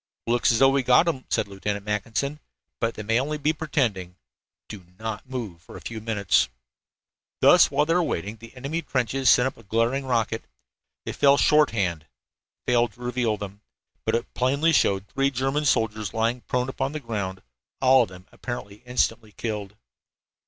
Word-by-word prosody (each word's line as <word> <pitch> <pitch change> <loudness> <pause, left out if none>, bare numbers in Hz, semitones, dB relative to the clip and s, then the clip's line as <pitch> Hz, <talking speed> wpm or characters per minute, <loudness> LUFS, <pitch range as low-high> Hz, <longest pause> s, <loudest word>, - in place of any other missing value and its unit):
"Looks 120 +1 +3
as 115 - +2
though 135 +3 +6
we 135 0 +2
got 125 +3 +5
them," 155 -7 -2
said - - 0
Lieutenant 100 +1 -4
Mackinson, 115 +8 -2 0.4
"but 115 0 -1
they 105 - -6
may 115 +2 +1
be - - +4
only 150 +3 -2 0.2
pretending. 120 - -1 0.5
Do 105 -4 -9
not 110 +3 -5
move 110 -10 -5
for - - -12
a - - -11
few 115 -1 -6
minutes." 100 - +2 0.9
While 145 +2 +5
they 165 - +1
were - - +3
thus 175 - +1
waiting, 105 +6 -3
the 115 +3 -14
enemy 140 +6 -3
trenches 130 -2 0
sent 125 - +6
up 130 - -3
a 115 - -15
glaring 115 +6 0
rocket. 115 -2 0 0.6
It - - -4
fell 140 0 +5
shorthand 105 - +2 0.6
failed 120 -2 +2
to 120 - -19
reveal 120 -3 0
them, 100 0 -8 0.4
but - - +1
it 115 - -3
plainly 140 +6 +2
showed 100 -8 +2
three 135 +6 0
German 135 +3 -1
soldiers 110 -6 0
lying 115 +2 0
prone 125 0 0
upon 135 +1 -3
the 155 - -3
ground, 100 -7 -4 0.4
all 130 0 +6
of 115 - 0
them 90 0 -13
apparently 105 -5 -7
instantly 115 -3 0
killed. 105 -3 -4
115 Hz, 175 wpm, -25 LUFS, 105-135 Hz, 0.9 s, though